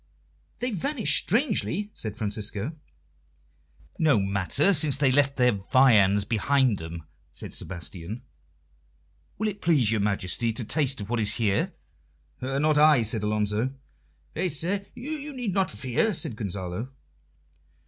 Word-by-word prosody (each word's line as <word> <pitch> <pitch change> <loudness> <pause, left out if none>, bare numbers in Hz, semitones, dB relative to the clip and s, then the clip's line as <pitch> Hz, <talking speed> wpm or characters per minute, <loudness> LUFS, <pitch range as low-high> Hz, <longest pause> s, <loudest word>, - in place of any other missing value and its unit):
"They 245 +1 -1
vanished 235 - +1
strangely," 210 - +1
said 110 -1 -6
Francisco. 105 +5 -3 1.2
"No 150 -8 +4
matter, 100 - +2
since 150 -4 +4
they 140 -2 +3
left 140 0 +2
their 125 -1 +4
viands 105 -2 +4
behind 120 +2 +1
them," 80 0 -7 0.3
said - - -8
Sebastian. 90 - -7 1.1
"Will 215 - -1
it 205 -1 -5
please 145 -10 +3
your 110 -2 +1
Majesty 100 +2 0
to 120 - -3
taste 135 -3 0
of 100 +3 -7
what 120 - 0
is 105 -1 +3
here?" 105 -4 0 0.7
"Not 140 +4 +1
I," 150 -5 +6
said 110 0 -1
Alonso. 105 +4 -1 0.6
"Faith, 175 -1 -2
sir, 185 +6 -2
you 295 +3 -5
need 245 -7 -3
not 190 0 +1
fear," 125 - 0
said 155 -8 -3
Gonzalo. 100 +2 -5
125 Hz, 130 wpm, -26 LUFS, 105-160 Hz, 1.2 s, I